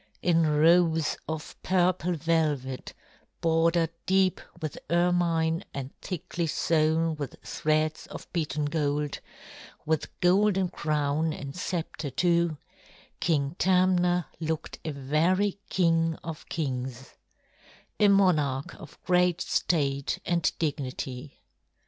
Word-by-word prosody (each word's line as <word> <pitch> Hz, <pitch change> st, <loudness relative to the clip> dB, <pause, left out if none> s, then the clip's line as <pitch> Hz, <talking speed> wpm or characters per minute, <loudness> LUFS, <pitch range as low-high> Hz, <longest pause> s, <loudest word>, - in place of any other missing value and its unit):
In 165 Hz, -2 st, +3 dB
robes 160 Hz, +1 st, +4 dB
of 160 Hz, 0 st, -5 dB
purple 180 Hz, -1 st, +1 dB
velvet 150 Hz, -5 st, -1 dB, 0.4 s
bordered 165 Hz, 0 st, +2 dB, 0.2 s
deep 190 Hz, -1 st, +3 dB, 0.2 s
with 155 Hz, -3 st, -4 dB
ermine 170 Hz, -1 st, +2 dB
and 135 Hz, -1 st, -5 dB
thickly 175 Hz, -1 st, -3 dB
sewn 160 Hz, +1 st, +1 dB
with 145 Hz, -3 st, -5 dB
threads 155 Hz, 0 st, 0 dB
of -, -, -9 dB
beaten 155 Hz, -3 st, -1 dB
gold, 145 Hz, -1 st, -1 dB, 0.7 s
with 160 Hz, -1 st, 0 dB
golden 190 Hz, +1 st, +3 dB
crown 150 Hz, +1 st, 0 dB
and 140 Hz, 0 st, -7 dB
sceptre 170 Hz, -4 st, -3 dB
too, 170 Hz, +2 st, +1 dB, 0.6 s
King 145 Hz, -2 st, 0 dB
Tamna 180 Hz, -2 st, +3 dB
looked 160 Hz, -1 st, -3 dB
a -, -, -3 dB
very 165 Hz, +9 st, +1 dB
king 165 Hz, -2 st, +2 dB
of 160 Hz, -2 st, -7 dB
kings, 130 Hz, -4 st, -4 dB, 0.9 s
a 210 Hz, -, +6 dB
monarch 155 Hz, -9 st, +2 dB
of 155 Hz, -, -12 dB
great 180 Hz, -1 st, +3 dB
state 140 Hz, -5 st, 0 dB
and 170 Hz, -2 st, +1 dB
dignity. 135 Hz, -2 st, -4 dB
160 Hz, 105 wpm, -27 LUFS, 150-175 Hz, 0.9 s, a